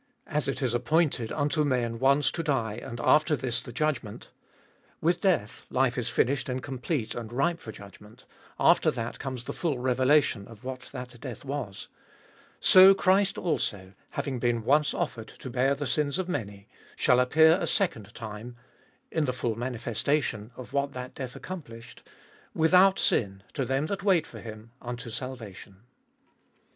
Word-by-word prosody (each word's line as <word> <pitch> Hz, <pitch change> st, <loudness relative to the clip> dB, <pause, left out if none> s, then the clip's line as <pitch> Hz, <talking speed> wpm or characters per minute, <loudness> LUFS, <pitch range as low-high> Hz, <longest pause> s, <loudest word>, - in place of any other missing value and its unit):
As 150 Hz, -1 st, -1 dB
it 135 Hz, 0 st, -2 dB
is 125 Hz, -2 st, +1 dB
appointed 135 Hz, -3 st, +1 dB
unto 150 Hz, +1 st, +1 dB
men 120 Hz, -5 st, 0 dB
once 140 Hz, +3 st, +3 dB
to 170 Hz, -, -3 dB
die, 135 Hz, -9 st, 0 dB
and 115 Hz, -, -7 dB
after 155 Hz, +4 st, +4 dB
this 125 Hz, -4 st, -2 dB
the -, -, -9 dB
judgment— 125 Hz, -5 st, -2 dB, 0.7 s
with 170 Hz, +2 st, +1 dB
death, 165 Hz, -, 0 dB
life 130 Hz, -1 st, +2 dB
is 125 Hz, -3 st, -2 dB
finished 130 Hz, 0 st, +1 dB
and 125 Hz, 0 st, -3 dB
complete, 130 Hz, -2 st, -3 dB
and 115 Hz, -2 st, -6 dB
ripe 165 Hz, +7 st, 0 dB
for 110 Hz, -, -8 dB
judgment; 105 Hz, +3 st, -14 dB, 0.3 s
after -, -, +5 dB
that 115 Hz, 0 st, -4 dB
comes 130 Hz, -3 st, -5 dB
the -, -, -5 dB
full 160 Hz, -7 st, -1 dB
revelation 130 Hz, -3 st, +2 dB
of 115 Hz, -2 st, -14 dB
what 130 Hz, 0 st, -7 dB
that 125 Hz, -3 st, -8 dB
death 125 Hz, -1 st, -7 dB
was 135 Hz, -8 st, -5 dB, 0.4 s
— -, -, -28 dB, 0.3 s
so 190 Hz, +1 st, +8 dB
Christ 195 Hz, +1 st, +3 dB
also, 100 Hz, -, -2 dB, 0.2 s
having 135 Hz, -4 st, -3 dB
been 120 Hz, -1 st, 0 dB
once 145 Hz, +5 st, +3 dB
offered 125 Hz, -10 st, -3 dB
to 130 Hz, -, -8 dB
bear 130 Hz, +3 st, +2 dB
the 145 Hz, +1 st, -4 dB
sins 145 Hz, +2 st, 0 dB
of 185 Hz, -2 st, -2 dB
many, 100 Hz, -, -4 dB, 0.3 s
shall 125 Hz, -, +4 dB
appear 160 Hz, +6 st, +5 dB
a -, -, -1 dB
second 110 Hz, -, -1 dB
time 110 Hz, +1 st, -7 dB, 0.3 s
— -, -, -37 dB
in 160 Hz, -, +1 dB
the 130 Hz, -, 0 dB
full 120 Hz, -2 st, -1 dB
manifestation 120 Hz, 0 st, -1 dB
of 125 Hz, -4 st, -10 dB
what 140 Hz, 0 st, 0 dB
that 125 Hz, 0 st, -7 dB
death 130 Hz, -2 st, -6 dB
accomplished 120 Hz, -10 st, -9 dB, 0.3 s
— -, -, -28 dB
without 185 Hz, +3 st, +6 dB
sin, 95 Hz, -2 st, +1 dB
to 135 Hz, -, -1 dB
them 135 Hz, +4 st, 0 dB
that 195 Hz, +3 st, -3 dB
wait 190 Hz, -4 st, +3 dB
for -, -, -11 dB
Him, 110 Hz, 0 st, -10 dB
unto 120 Hz, -1 st, -6 dB
salvation. 110 Hz, -6 st, -8 dB
130 Hz, 170 wpm, -28 LUFS, 115-150 Hz, 0.7 s, so